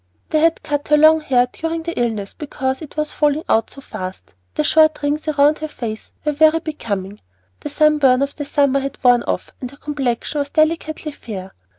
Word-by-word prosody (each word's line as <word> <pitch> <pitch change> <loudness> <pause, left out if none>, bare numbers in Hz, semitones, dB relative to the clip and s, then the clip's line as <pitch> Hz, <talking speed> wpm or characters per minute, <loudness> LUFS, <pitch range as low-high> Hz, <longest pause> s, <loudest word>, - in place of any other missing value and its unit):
They 310 - +3
had 330 +1 +2
cut 290 -1 -2
her 300 - +4
long 315 +1 +6
hair 250 -4 +2
during 325 0 -3
the 335 +1 -4
illness 220 -6 -2
because 265 -2 -3
it 305 -1 -11
was 305 0 -1
falling 295 +1 +1
out 225 - +2
so 275 - -12
fast; 185 -6 -8 0.2
the - - +1
short 310 - +4
rings 295 +2 -1
round 290 +2 +4
her 310 - -3
face 225 -7 -6
were 300 - +2
very 310 +2 +4
becoming, 210 - -5 0.4
the - - -6
sunburn 290 -3 +3
of 280 - -4
the 290 - -5
summer 280 -1 +2
had 275 0 -5
worn 245 -1 +5
off - - -3
and 250 - -4
her 280 - -16
complexion 285 -1 -2
was 285 0 -2
delicately 310 0 0
fair. 195 -9 -8
290 Hz, 200 wpm, -19 LUFS, 250-310 Hz, 0.4 s, long